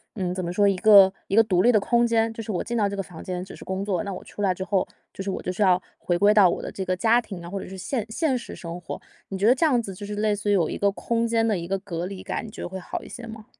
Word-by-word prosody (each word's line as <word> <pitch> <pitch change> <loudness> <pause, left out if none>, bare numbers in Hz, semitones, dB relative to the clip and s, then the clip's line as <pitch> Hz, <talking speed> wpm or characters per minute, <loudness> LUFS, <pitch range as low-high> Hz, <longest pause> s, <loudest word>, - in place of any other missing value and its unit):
嗯 185 -4 -2
怎 185 0 -3
么 175 - -3
说， 205 +2 +3
一 195 -2 +2
个 195 0 +7
一 195 - -1
个 225 - +7
独 185 -4 +2
立 245 +5 +5
的 215 - +5
空 235 +1 +3
间。 225 -1 +1
就 225 - -6
是 220 - -5
我 180 - -1
进 235 0 -3
到 205 -2 +3
这 200 - -4
个 195 - -2
房 175 -4 -11
间 180 -1 -4
只 190 - -10
是 - - -11
工 190 +1 -3
作， 200 -1 -1
那 200 -1 -4
我 180 - -8
出 - - -9
来 195 -2 +2
之 185 - -5
后， 195 -1 0 0.3
就 195 - -6
是 195 - -3
我 - - -4
就 - - -3
是 185 - -5
要 185 -1 +4 0.2
回 175 - -1
归 205 +3 +5
到 205 -3 +7
我 - - -2
的 - - -6
这 190 - -5
个 185 - 0
家 230 +5 +4
庭 190 -7 -9
啊， 170 - -8
或 195 - -4
者 - - -8
是 190 - -8
现 215 +4 -2
现 265 +2 0
实 235 - -8
生 170 0 -7
活。 175 - -7 0.3
你 195 - -4
觉 200 - 0
得 245 - +7
这 295 - +2
样 255 -6 +3
子 195 -4 -7
就 205 - -7
是 210 +1 -5
类 210 0 +1
似 205 0 -3
于 - - +4
有 175 -5 +2
一 - - -4
个 200 0 +2
空 230 +3 -1
间 225 0 +2
的 215 -3 +1
一 170 0 -5
个 195 +2 0
隔 175 -3 -4
离 190 0 -6
感， - - -3
你 220 - -8
觉 - - -9
得 - - -4
会 190 +1 -6
好 180 - -6
一 - - -11
些 240 - -8
吗？ 220 -1 -9
200 Hz, 380 characters per minute, -25 LUFS, 185-220 Hz, 0.3 s, 个